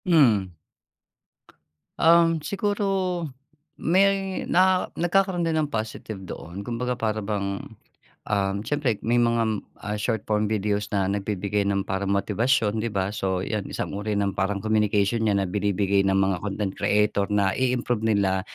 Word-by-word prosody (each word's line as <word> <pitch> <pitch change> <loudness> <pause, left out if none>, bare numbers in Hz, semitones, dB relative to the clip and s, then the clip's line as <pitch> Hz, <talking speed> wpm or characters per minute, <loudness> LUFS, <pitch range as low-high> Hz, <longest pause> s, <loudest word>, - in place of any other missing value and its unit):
Mm. 120 - +4 1.5
Um, 165 0 +5
siguro 195 -1 -1 0.5
may 195 +2 +2
na 185 +1 +3
nagkakaroon 180 +1 +1
din 165 -1 0
ng 150 -2 -1
positive 110 -2 -4
doon. 90 +1 -8
Kumbaga 125 +2 -2
para 110 -2 -1
bang, 100 -2 -2 0.7
um, 100 -1 0
siyempre 135 -5 0
may 120 +2 +2
mga, 115 -3 +1 0.2
ah, 105 0 -4
short-form 105 -1 -1
videos 105 -1 -1
na 100 -2 +1
nagbibigay 100 0 -1
ng 100 -1 0
parang 95 +1 -2
motibasyon, 110 +2 +1
'di 115 - -1
ba? 100 0 -1
So, 95 -3 -1
'yan, 105 -3 -3
isang - - -4
uri 105 +1 -2
ng 100 -1 0
parang 95 +2 0
communication 105 +1 +1
'yan 100 -1 +2
na 95 - -1
binibigay 100 0 +1
ng 95 0 +2
mga 95 -1 +2
content 100 -1 -2
creator 105 -1 +1
na 100 -2 +2
i-improve 125 -3 0
nila 100 -4 +2
105 Hz, 140 wpm, -25 LUFS, 100-125 Hz, 1.5 s, Um